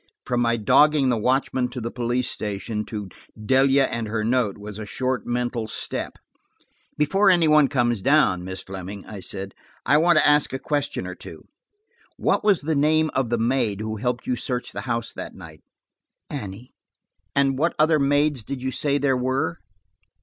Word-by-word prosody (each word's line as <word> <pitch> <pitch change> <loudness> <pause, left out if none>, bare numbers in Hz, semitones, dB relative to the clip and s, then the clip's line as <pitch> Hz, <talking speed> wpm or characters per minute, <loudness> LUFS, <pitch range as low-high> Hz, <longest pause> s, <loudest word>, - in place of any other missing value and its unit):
From 120 -1 0
my 115 0 +2
dogging 145 +5 +4
the 125 - +2
watchman 130 +1 +1
to 130 - -6
the 115 0 -4
police 125 +1 -1
station, 105 -1 -4
to 105 -4 -6 0.3
Delia 135 +4 +3
and 115 -2 -3
her 110 0 -2
note, 115 -2 +1
was 105 0 -8
a 110 - -5
short 130 +1 -2
mental 120 -2 -2
step. - - -4 0.8
"Before 195 +7 +3
any 175 -3 +4
one 150 -2 +5
comes 120 -6 0
down, 135 -9 +3
Miss 95 +1 -6
Fleming," 95 +1 -8
I 105 - -8
said, 95 +1 -5 0.3
"I 145 +4 +4
want 170 0 +4
to - - +5
ask 145 -2 +4
a - - -1
question 145 +1 -2
or - - -5
two. - - -12 0.7
What - - +1
was 205 -4 +3
the 160 +2 -1
name 155 +2 +2
of 130 -3 0
the 120 - +1
maid 115 -3 0
who 110 0 -4
helped 125 +2 -2
you 125 - 0
search 125 0 -3
the - - -5
house 115 0 -2
that - - -7
night? - - -12 0.7
"Annie." 115 -3 -7 0.6
"What 140 +4 +2
other 155 0 +4
maids 145 -2 +2
did 135 +3 -5
you 130 +1 -3
say 140 +2 0
there 140 -2 +1
were?" 130 -8 -1
125 Hz, 180 wpm, -23 LUFS, 110-145 Hz, 0.8 s, one